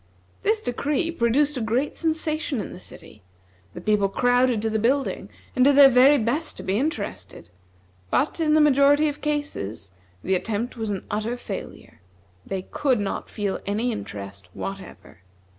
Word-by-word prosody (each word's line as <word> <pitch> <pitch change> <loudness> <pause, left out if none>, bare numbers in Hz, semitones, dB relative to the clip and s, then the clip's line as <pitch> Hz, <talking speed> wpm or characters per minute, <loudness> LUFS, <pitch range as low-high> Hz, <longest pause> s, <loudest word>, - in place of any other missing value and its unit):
This 435 +1 +1
decree 295 +7 -1
produced 285 +1 +1
a - - -2
great 235 +6 -1
sensation 315 -4 -1
in - - -5
the 180 - -10
city. 105 - -13 0.5
The - - -7
people 210 -2 +2
crowded 245 +1 +2
to 225 - +1
the 220 - 0
building, 265 +5 0 0.3
and 255 - +4
did 280 +1 +5
their 280 -1 +9
very 265 +3 +6
best 275 +7 -1
to - - -7
be 195 +3 0
interested; 200 - -4 0.6
but, 295 +5 0
in 310 -2 +3
the 310 - +5
majority 290 +1 +5
of 290 - -7
cases, 290 - -3 0.3
the 190 - 0
attempt 220 +6 -2
was 225 -2 -4
an 195 -2 -4
utter 215 +4 -2
failure. 245 - -8 0.4
They 190 -1 -4
could 255 +3 0
not 200 -1 -3
feel 205 -3 -3
any 220 +5 0
interest 100 - -7
whatever. 195 - -8
245 Hz, 160 wpm, -24 LUFS, 205-290 Hz, 0.6 s, their